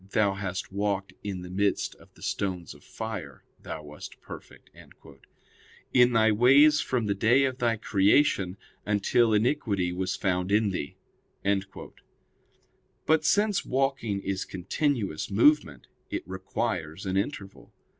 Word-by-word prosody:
'Thou 105 -4 +3
hast 95 -1 -5
walked 100 0 -2
in 95 -3 -5
the 90 - -9
midst 100 +2 0
of - - -20
the - - -15
stones 90 -4 -3
of - - -18
fire; 100 - -7 0.2
thou 80 - -7
wast 75 0 -11
perfect.. - - -12 0.6
.'] - - -29
in 125 -1 +5
thy 110 -1 +4
ways 140 +7 +6
from 125 -3 -1
the 100 - +1
day 115 +7 +3
of 130 -1 -1
thy 115 -2 +1
creation 100 -2 +2 0.3
until 105 +3 +2
iniquity 105 -5 +1
was 90 +1 -2
found 90 -1 -1
in 105 0 +3
thee." 75 -6 -5 2.1
But 160 0 +3
since 205 +4 +2
walking 130 -6 -1
is 95 0 -2
continuous 100 - -2
movement, 100 - +3 0.2
it - - -5
requires 95 -2 -4
an 95 0 -2
interval. 100 -1 -4
100 Hz, 135 wpm, -27 LUFS, 95-120 Hz, 2.1 s, ways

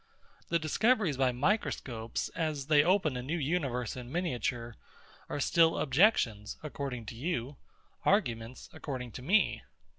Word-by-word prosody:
The 170 - +3
discoveries 185 - +2
by 130 -1 +2
microscopes, 125 - -1
as 155 -4 -2
they 150 0 +5
open 180 -5 +2
a 125 - -3
new 150 +7 -2
universe 135 -7 -1
in 125 -1 -8
miniature, 125 -8 -2 0.5
are - - -3
still 165 +3 +4
objections, 125 - +2
according 140 -5 -5
to 115 - -7
you, 135 -1 -3 0.5
arguments, 120 - 0
according 125 -4 -5
to 125 - -8
me. 195 +11 +2
140 Hz, 130 wpm, -31 LUFS, 125-170 Hz, 0.5 s, they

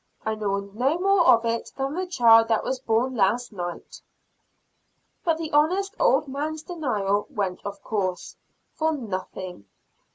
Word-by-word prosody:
"I 220 - 0
know 200 -2 -3
no 265 +9 +1
more 380 -1 +3
of 230 0 +6
it 230 0 -2
than 270 +1 -2
the 370 +3 -3
child 230 -8 +6
that 225 -1 +1
was 260 - -2
born 245 +1 0
last 240 +2 +1
night." 175 -3 -7 1.2
But 330 -3 +1
the 320 -1 -5
honest 365 +7 +2
old 485 -11 +3
man's 300 +3 -4
denial 210 - -1
went 195 -3 -3
of 200 0 -7
course, 185 -4 -3 0.4
for 320 0 0
nothing. 185 - -6
235 Hz, 150 wpm, -25 LUFS, 200-310 Hz, 1.2 s, of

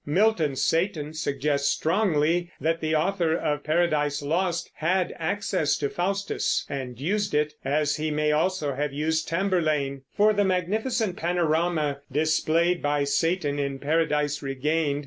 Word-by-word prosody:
Milton's 160 -4 +1
Satan 160 -3 0
suggests 145 -2 -1
strongly 170 -1 +1
that 165 +1 0
the 155 0 0
author 170 0 +1
of 150 -3 -2
Paradise 150 -3 +1
Lost 170 +3 -1
had 180 +3 0
access 180 -2 0
to 140 -1 -2
Faustus 195 +3 -1
and 130 -4 -5
used 200 +4 -1
it, 150 0 +1
as 150 +1 +1
he 155 +1 -1
may 150 0 +1
also 155 -2 0
have 145 +1 -2
used 160 +2 -1
Tamburlaine, 155 -7 0 0.2
for 215 +1 +5
the 205 0 +2
magnificent 200 +3 0
panorama 165 -3 0
displayed 160 +4 +1
by 145 0 +1
Satan 145 +1 0
in 140 -1 -2
Paradise 150 0 0
Regained. 145 +2 -1
155 Hz, 135 wpm, -26 LUFS, 145-175 Hz, 0.2 s, for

